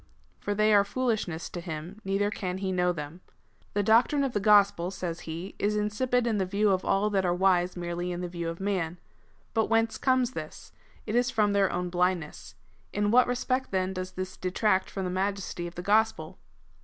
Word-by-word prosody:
^ - - -31 0.4
For 205 - -1
they 215 +1 +3
are 200 -1 +6
foolishness 205 -8 -2
to 175 - -5
him, 170 +4 -7
neither 195 +1 0
can 185 -4 -3
he 190 0 -2
know 180 -1 +2
them. 155 +1 -7 0.3
" - - -35
The 205 - +2
doctrine 240 +7 +4
of 265 -3 -1
the 205 - +1
gospel," 200 -4 +4
says 175 -3 -4
he, 170 +5 -6
" - - -35
is 210 +1 +1
insipid^ 240 +4 0
in 220 -3 0
the 190 - +1
view 200 +2 +2
of 185 -1 +1
all 210 +2 +1
that 195 -2 +1
are 175 -1 +1
wise 180 -1 +2
merely 175 0 -3
in 175 0 -4
the 180 - -3
view 170 -1 -4
of 165 - -6
man. 185 -4 -1 0.6
But 225 -2 +2
whence 225 0 +1
comes 255 -2 +2
this? - - -8 0.3
It 215 - -4
is 245 +1 +2
from 210 -4 +2
their 200 -2 +3
own 180 0 -2
blindness. 180 -3 -1 0.4
In 205 0 0
what 250 +1 +5
respect, 255 +1 -1
then, 190 0 -1
does 185 0 -5
this 185 0 -5
detract 190 +1 +1
from 195 - -4
the 180 - -2
majesty 190 -2 -2
of 170 - -10
the 175 - -6
gospel?" 220 +3 +1
195 Hz, 215 wpm, -28 LUFS, 180-215 Hz, 0.6 s, are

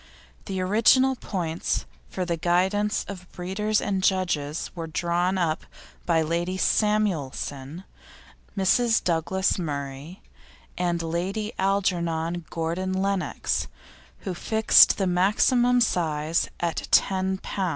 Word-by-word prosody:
The 190 -2 -4
original 230 +7 +4
points 175 -8 -3 0.2
for 185 - -3
the 170 -1 -1
guidance 190 +5 +1
of 180 -2 -9
breeders 205 +4 -1
and 195 -2 -1
judges 175 -6 0
were 165 -2 -6
drawn 175 +3 0
up 165 -3 0 0.4
by 165 -2 +3
Lady 170 +3 -2
Samuelson, 170 -8 -1 0.7
Mrs. 225 +4 +3
Douglas 185 +3 0
Murray, 145 +1 -5 0.5
and 175 -2 -1
Lady 190 +7 -3
Algernon 175 -4 0
Gordon 170 +3 -2
Lennox, 195 0 -1 0.5
who 190 - -4
fixed 220 +5 +5
the 195 - 0
maximum 225 +7 +3
size 165 -7 0
at 170 -1 -2
10 190 0 +2
lb. 190 -1 -3
185 Hz, 110 wpm, -25 LUFS, 165-195 Hz, 0.7 s, fixed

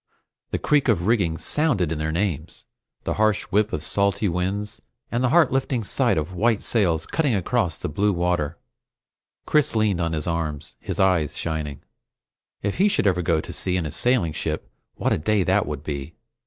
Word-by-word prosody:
The - - -1
creak 150 -2 +2
of 95 -8 +2
rigging 95 -8 +2
sounded 115 - 0
in 80 - -2
the 80 0 -1
names, 85 -2 -2 0.4
the - - -1
harsh 110 -1 +3
whip 105 +2 +2
of 75 - -3
salty 100 +4 +1
winds, 100 +4 -2 0.3
and 120 +2 0
the 130 - +3
heart 165 +1 +5
lifting 130 -2 0
sight 100 - +1
of 80 +4 -2
white 110 +4 +1
sails 85 -8 +1
cutting 145 -8 +1
across 95 - 0
blue 100 +8 +1
water. 85 -3 0 0.9
Chris 150 -6 +2
leaned 105 -5 +2
on 85 -1 -1
his 75 -1 -2
arms, 80 -4 -3
his - - -5
eyes 90 -6 +2
shining. 75 -3 -4 0.8
If 100 0 -1
he 195 +4 +4
should 200 - +1
ever 90 -3 +3
go 80 -2 +2
to - - -8
sea 90 -1 0
in 85 - -1
a 75 - -4
sailing 120 - +1
ship, - - -4 0.2
what - - +1
a - - 0
day 105 +4 +2
that 95 +2 +2
would 75 -2 -5
be! 70 +1 -5
95 Hz, 185 wpm, -24 LUFS, 80-110 Hz, 0.9 s, heart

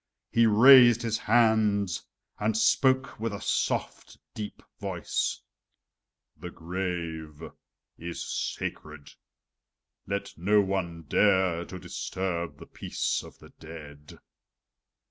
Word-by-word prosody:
He 115 0 +4
raised 120 +1 +7
his 115 -1 -1
hand 110 -4 +2 0.5
and 110 +1 0
spoke 130 +3 +2
with 115 0 -2
a 100 - -6
soft, - - -2 0.2
deep 105 -1 -7 0.2
voice: - - -3 0.9
"The 90 +4 -8
grave 85 -3 -5 0.6
is 85 +1 -6
sacred! 75 -2 -5 0.9
Let 100 0 -4
no 105 +4 +3
one 95 -4 -2
dare 95 0 +2
to 95 - -8
disturb 90 -1 -4
the - - -12
peace - - -3
of - - -14
the - - -16
dead." 75 -2 -11
95 Hz, 105 wpm, -27 LUFS, 85-110 Hz, 0.9 s, raised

